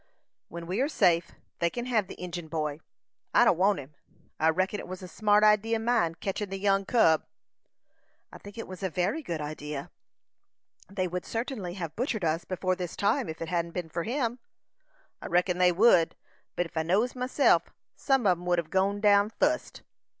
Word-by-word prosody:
"When 170 0 -8
we 185 +8 -1
are 280 - +1
safe, 170 - +2 0.3
they 170 - +2
kin 240 +6 -5
hev 225 -6 +1
the - - -9
Injin 175 -2 -6
boy; 150 -2 -2 0.6
I - - +7
don't - - +5
want 195 +3 +3
him. 145 +1 -9 0.5
I 160 - +4
reckon 185 +5 0
it - - -8
was 185 0 -7
a - - -7
smart 210 +3 +2
idee 215 +2 +4
o' - - -1
mine, 225 -8 +1
ketchin' 195 +3 -4
the 195 - -4
young 195 0 +1
cub." 165 -9 +4 1.1
"I - - -11
think 205 +2 -12
it 230 - -6
was 185 0 -9
a 190 - -1
very 185 - -1
good 170 - -4
idea. 150 -1 -6 1.0
They 190 -2 -2
would 180 +1 -4
certainly 225 -6 -4
have 165 -5 -5
butchered 225 - -1
us 160 +1 0
before 185 0 -1
this 180 -2 -5
time 200 -4 +1
if 160 +1 -5
it 165 - -6
hadn't 170 -1 -1
been 175 -3 -4
for 170 +2 -3
him." 240 - -2 0.8
"I - - -6
reckon 180 +1 +1
they 180 0 +5
would; 175 -3 +4 0.4
but 175 - 0
ef 165 - -13
I - - +3
knows 195 +10 +1
myself, 255 +3 +2 0.3
some 270 -4 +1
on 180 -3 +3
'em 175 - -10
would 175 0 +3
hev 165 -2 -3
gone 200 +2 +1
down 205 -1 +5
fust." 300 +7 -1
185 Hz, 200 wpm, -28 LUFS, 170-215 Hz, 1.1 s, I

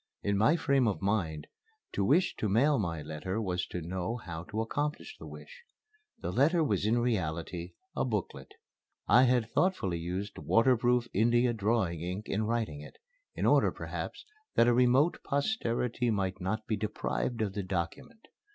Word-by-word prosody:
In 100 0 +1
my 110 +11 +4
frame 140 -6 +2
of 105 - 0
mind, 90 -7 -1 0.5
to 100 - -1
wish 175 - +3
to 105 - -1
mail 135 +8 +3
my 85 -6 -2
letter 95 +8 -4
was 90 -4 -2
to 90 - -5
know 95 +6 -3
how 85 -7 -7
to 110 0 -4
accomplish 150 - -3
the - - -9
wish. - - -11 0.6
The - - -3
letter 160 +6 +3
was 105 - 0
in 115 +2 +3
reality 90 -6 -2 0.2
a - - +1
booklet. 105 -7 -3 0.6
I 125 +2 +6
had 120 -3 +1
thoughtfully 110 - +1
used 90 +5 -4
waterproof 120 0 +3
India 120 +3 +3
drawing 105 -6 0
ink 90 +5 -4
in 105 +2 -1
writing 110 -11 -2
it, 75 - -12 0.4
in - - -1
order, - - +4
perhaps, - - -6 0.3
that 115 - +5
a 120 - +5
remote 125 +6 +3
posterity 125 - 0
might 95 -3 -1
not 110 +4 -2
be 110 - 0
deprived 110 +3 -2
of 100 -3 -3
the 100 - -2
document. 100 - -5
110 Hz, 165 wpm, -30 LUFS, 95-125 Hz, 0.6 s, I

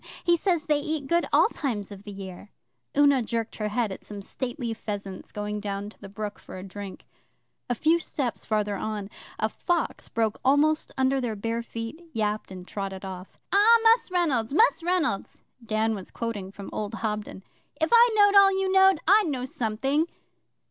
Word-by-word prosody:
He 345 -1 +4
says 345 -2 0
they 300 -2 +2
eat 305 -1 -3
good 340 +4 +1
all - - +6
times 215 -9 -3
of 200 +1 -10
the 205 - -7
year,' 195 0 -9 0.5
Una 285 -2 +5
jerked 230 0 -3
her 215 - -1
head 215 0 0
at 190 - -8
some 205 -1 -8
stately 240 +3 -4
pheasants 200 -3 -6
going 210 0 -3
down 205 0 -4
to - - -23
the 200 - -9
brook 205 +1 -5
for - - -10
a 185 - -7
drink. 195 0 -8 0.6
A 245 - +1
few 320 +8 +3
steps 270 -6 -3
farther 210 -2 0
on 210 -1 -4 0.3
a 220 - +1
fox 345 +9 -2
broke 225 -2 0
almost 295 +4 +3
under 265 0 +2
their 235 -3 -2
bare 230 +3 -2
feet, 230 +6 -7
yapped, 215 -2 -1
and 185 -1 -9
trotted 195 -1 -5
off. 185 0 -8 0.2
'Ah, 430 +4 +7
Mus' 455 0 +5
Reynolds 290 -9 0
Mus' 450 -1 +4
Reynolds' 345 - -1 0.2
Dan 220 0 0
was 195 -3 -6
quoting 210 -5 -4
from 200 0 -9
old 210 +1 -3
Hobden, 210 -3 -4 0.4
'if 320 - +1
I 475 +1 +8
knowed 410 -1 +6
all 395 -1 +8
you 380 -1 0
knowed, 385 -2 +6
I'd 410 +1 +6
know 260 -4 -2
something. 265 +6 0
230 Hz, 185 wpm, -26 LUFS, 205-310 Hz, 0.6 s, I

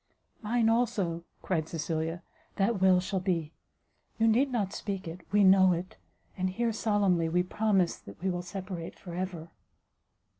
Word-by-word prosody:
"Mine, 230 +1 +1
also," 210 -8 0 0.2
cried 160 -4 -1
Cecilia, 165 +1 -3 0.3
"that 195 0 +1
will 185 -1 +6
shall 190 +1 -2
be; 170 -4 -1 0.6
you 225 - +3
need 255 +5 +3
not 205 -6 -1
speak 195 -3 -4
it, 165 +3 -7
we 205 0 +4
know 190 -1 +6
it, 175 +2 -5 0.4
and 185 0 -1
here 230 +4 -1
solemnly 200 -7 +1
we 180 +2 +2
promise 190 -2 +1
that 100 - -13
we 190 +2 0
will 175 0 -3
separate 180 -1 -6
for 175 - -9
ever." 175 -2 -4
185 Hz, 155 wpm, -29 LUFS, 170-205 Hz, 0.6 s, will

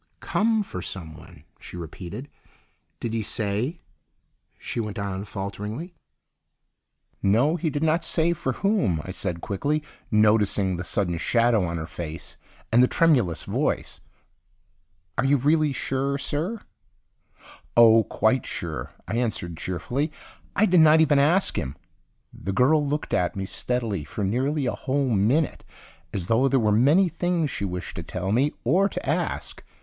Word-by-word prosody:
"Come 220 0 +1
for 90 - -6
someone," 80 -6 -9 0.2
she - - -10
repeated. 90 - -7 0.7
"Did 115 - -3
he 115 - 0
say—" 110 - -1 0.8
she - - -5
went 105 -3 -4
on 100 -1 -3
falteringly. 105 - -5 1.3
"No, 120 +11 +3
he 170 -2 -1
did 145 +1 -2
not 160 +1 +2
say 165 +1 +2
for 135 -5 -2
whom," 130 - +1
I 95 - -6
said 90 -3 -2
quickly, 145 +9 -1 0.3
noticing 105 -3 +3
the 90 - -4
sudden 90 -2 -1
shadow 115 -1 +3
on 85 0 -3
her 80 - -4
face 80 +1 -7 0.4
and 120 +2 +6
the 125 - +6
tremulous 125 - +2
voice. - - -2 1.2
"Are - - +3
you 140 +2 +4
really 150 +3 +2
sure, 135 +1 -1
sir?" 160 +10 -2 1.2
"Oh, 115 -1 +7
quite - - +1
sure," - - -5
I 110 +6 -2
answered 110 -8 -2
cheerfully. 120 - -2 0.4
"I 210 - +4
did 180 -3 +4
not 160 0 +7
even 150 -3 +4
ask 170 +7 +3
him." 65 +1 -4 0.6
The 95 - -5
girl 145 +8 +4
looked 145 +1 -2
at 90 - +1
me 95 0 -3
steadily 115 -5 -2
for 100 +8 -5
nearly 130 +8 0
a 125 - +1
whole 135 0 -1
minute 115 +10 +1 0.5
as 95 -4 -2
though 115 +7 +3
there 135 0 +3
were 110 -2 +2
many 145 - +4
things 170 -2 -1
she 100 - -3
wished 90 -2 -5
to - - -3
tell 90 +3 -4
me 135 +7 +2
or 185 - +3
to - - -6
ask. - - -2
120 Hz, 150 wpm, -25 LUFS, 95-150 Hz, 1.3 s, Oh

